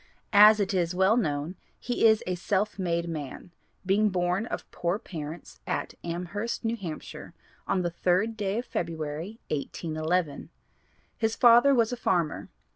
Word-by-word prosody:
As 210 Hz, +1 st, +8 dB
it 200 Hz, -1 st, 0 dB
is 180 Hz, -1 st, 0 dB
well 190 Hz, +4 st, +4 dB
known 155 Hz, -5 st, -1 dB, 0.2 s
he 240 Hz, -2 st, +2 dB
is 220 Hz, -1 st, +4 dB
a 180 Hz, -, -1 dB
self 195 Hz, +3 st, -1 dB
made 170 Hz, -2 st, -1 dB
man, 155 Hz, +1 st, -6 dB, 0.3 s
being 205 Hz, +3 st, +3 dB
born 180 Hz, +3 st, 0 dB
of -, -, -5 dB
poor 175 Hz, +3 st, -1 dB
parents 165 Hz, -6 st, -8 dB
at -, -, -2 dB
Amherst, 180 Hz, +8 st, -4 dB
New 225 Hz, +1 st, 0 dB
Hampshire, 175 Hz, -8 st, -8 dB, 0.3 s
on 185 Hz, -, +1 dB
the 175 Hz, -, -1 dB
3rd 185 Hz, +6 st, +1 dB
day 205 Hz, -1 st, -2 dB
of 240 Hz, -, -3 dB
February, 165 Hz, +4 st, -4 dB
1811. 155 Hz, +1 st, -2 dB, 0.7 s
His 225 Hz, 0 st, 0 dB
father 240 Hz, +3 st, +6 dB
was 230 Hz, 0 st, +2 dB
a -, -, -3 dB
farmer. 175 Hz, -8 st, -1 dB
185 Hz, 150 wpm, -27 LUFS, 170-215 Hz, 0.7 s, As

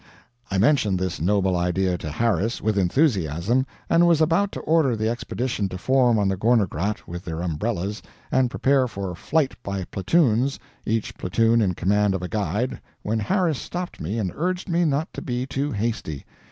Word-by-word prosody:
I 95 Hz, -, -1 dB
mentioned 105 Hz, -3 st, +3 dB
this 90 Hz, -3 st, -3 dB
noble 95 Hz, +1 st, +2 dB
idea 90 Hz, +1 st, +1 dB
to 75 Hz, -, -5 dB
Harris, 115 Hz, +6 st, 0 dB
with 110 Hz, -1 st, 0 dB
enthusiasm, 100 Hz, -, +1 dB, 0.2 s
and 170 Hz, +1 st, +4 dB
was 170 Hz, -3 st, +4 dB
about 165 Hz, +6 st, +2 dB
to -, -, -4 dB
order 155 Hz, -6 st, +2 dB
the 110 Hz, 0 st, -1 dB
Expedition 120 Hz, -2 st, -2 dB
to 90 Hz, -, -5 dB
form 125 Hz, +2 st, +3 dB
on 100 Hz, -2 st, +2 dB
the 95 Hz, -, +1 dB
Gorner 110 Hz, +2 st, +3 dB
Grat, 100 Hz, +7 st, -3 dB
with 85 Hz, +1 st, -6 dB
their 85 Hz, 0 st, -4 dB
umbrellas, 95 Hz, +4 st, -2 dB, 0.3 s
and 130 Hz, -1 st, +3 dB
prepare 135 Hz, 0 st, +2 dB
for 100 Hz, -5 st, -5 dB
flight 140 Hz, -, 0 dB
by 100 Hz, -1 st, -3 dB
platoons, 125 Hz, -, +1 dB, 0.3 s
each 110 Hz, 0 st, -1 dB
platoon 115 Hz, +5 st, +2 dB
in 95 Hz, -4 st, +1 dB
command 100 Hz, +2 st, +2 dB
of 90 Hz, -, -4 dB
a -, -, -2 dB
guide, 105 Hz, +6 st, -2 dB, 0.2 s
when 110 Hz, +2 st, 0 dB
Harris 170 Hz, -, +1 dB
stopped 180 Hz, 0 st, -6 dB
me 95 Hz, +9 st, -3 dB
and 95 Hz, -5 st, -1 dB
urged 180 Hz, +4 st, -2 dB
me 170 Hz, -1 st, +2 dB
not 150 Hz, +1 st, -1 dB
to -, -, -6 dB
be 125 Hz, -1 st, -2 dB
too 140 Hz, +2 st, -2 dB
hasty. 105 Hz, -, -3 dB
110 Hz, 180 wpm, -24 LUFS, 95-135 Hz, 0.3 s, and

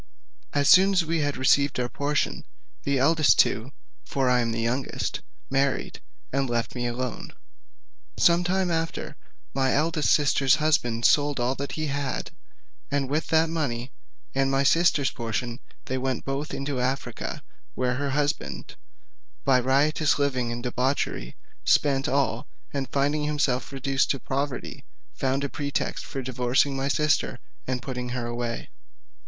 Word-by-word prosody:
As 145 Hz, -1 st, +2 dB
soon 195 Hz, +2 st, +7 dB
as 180 Hz, -3 st, +3 dB
we 165 Hz, +1 st, 0 dB
had 145 Hz, -1 st, -1 dB
received 140 Hz, +1 st, +3 dB
our 125 Hz, -, 0 dB
portions, 145 Hz, +3 st, -1 dB, 0.4 s
the 140 Hz, -, +1 dB
two -, -, +1 dB
eldest 155 Hz, +2 st, +5 dB, 0.6 s
(for 130 Hz, -2 st, 0 dB
I 125 Hz, -, +4 dB
am 115 Hz, -1 st, 0 dB
the 115 Hz, -, -2 dB
youngest) 125 Hz, +4 st, -2 dB, 0.3 s
married, 135 Hz, 0 st, 0 dB, 0.3 s
and 135 Hz, -1 st, 0 dB
left 120 Hz, -1 st, -1 dB
me 120 Hz, -1 st, -2 dB
alone. 120 Hz, 0 st, -4 dB, 0.8 s
Some 170 Hz, +1 st, +4 dB
time 185 Hz, 0 st, +1 dB
after, 165 Hz, 0 st, -2 dB, 0.4 s
my 135 Hz, 0 st, +2 dB
eldest 155 Hz, +1 st, +1 dB
sister's 140 Hz, -2 st, +4 dB
husband 125 Hz, -7 st, +1 dB
sold 145 Hz, -2 st, +4 dB
all 120 Hz, +2 st, +1 dB
that 140 Hz, +1 st, -5 dB
he 155 Hz, -, -2 dB
had, 140 Hz, -2 st, -3 dB, 0.6 s
and 140 Hz, -1 st, -1 dB
with 155 Hz, +2 st, 0 dB
that 160 Hz, 0 st, +3 dB
money 130 Hz, -6 st, -2 dB, 0.4 s
and 135 Hz, 0 st, +1 dB
my 135 Hz, 0 st, +2 dB
sister's 155 Hz, -2 st, +3 dB
portion 115 Hz, 0 st, -3 dB, 0.3 s
they 130 Hz, 0 st, -2 dB
went 130 Hz, -2 st, -2 dB
both 140 Hz, +2 st, -3 dB
into 140 Hz, -1 st, -3 dB
Africa, 130 Hz, +2 st, -3 dB, 0.3 s
where 125 Hz, -1 st, 0 dB
her 140 Hz, +2 st, -2 dB
husband, 145 Hz, +1 st, -2 dB, 0.7 s
by 130 Hz, -2 st, +5 dB
riotous 140 Hz, +4 st, +2 dB
living 130 Hz, -4 st, 0 dB
and 120 Hz, 0 st, -5 dB
debauchery' 125 Hz, -, -1 dB, 0.3 s
spent 140 Hz, 0 st, +3 dB
all; 135 Hz, -4 st, 0 dB, 0.3 s
and 135 Hz, -2 st, -2 dB
finding 145 Hz, +2 st, +1 dB
himself 145 Hz, -4 st, 0 dB
reduced 135 Hz, 0 st, 0 dB
to 135 Hz, -, 0 dB
poverty, 135 Hz, 0 st, -3 dB, 0.3 s
found 135 Hz, +1 st, -1 dB
a -, -, 0 dB
pretext 140 Hz, 0 st, -3 dB
for 135 Hz, -, -5 dB
divorcing 125 Hz, +2 st, +1 dB
my 135 Hz, 0 st, -1 dB
sister, 150 Hz, -3 st, +1 dB, 0.3 s
and 125 Hz, -2 st, -2 dB
put 130 Hz, +1 st, -5 dB
her 125 Hz, -1 st, -3 dB
away. 120 Hz, 0 st, -4 dB
135 Hz, 150 wpm, -26 LUFS, 125-145 Hz, 0.8 s, soon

